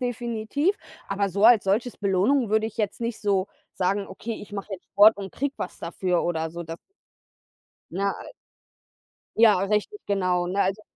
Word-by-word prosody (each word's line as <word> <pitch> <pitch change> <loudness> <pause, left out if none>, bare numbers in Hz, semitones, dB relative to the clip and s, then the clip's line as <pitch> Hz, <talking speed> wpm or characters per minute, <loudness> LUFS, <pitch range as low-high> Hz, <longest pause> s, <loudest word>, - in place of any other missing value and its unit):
definitiv. 245 - -1 0.3
Aber 200 0 0
so 200 +3 0
als 230 -3 +7
solches 220 +5 0
Belohnung 205 +5 +1
würde 220 0 +2
ich 220 - -9
jetzt 210 0 -2
nicht 230 -1 -3
so 200 -2 +1 0.3
sagen: 195 +2 -1
„Okay, 225 +4 -6
ich 205 0 -12
mache 200 0 -6
jetzt 185 - -7
Sport 215 +2 +6
und 195 -2 -7
kriege 280 +1 -2
was - - -6
dafür“, 175 +1 -1
oder 160 -2 -1
so. 170 +1 -6
Das 165 0 -7 1.1
Ne? 200 +3 0 1.3
Ja, 220 -4 +6
richtig, 210 - -1
genau, 180 -3 0
ne, 195 +3 0
also 195 +3 0
200 Hz, 165 wpm, -25 LUFS, 185-225 Hz, 1.3 s, als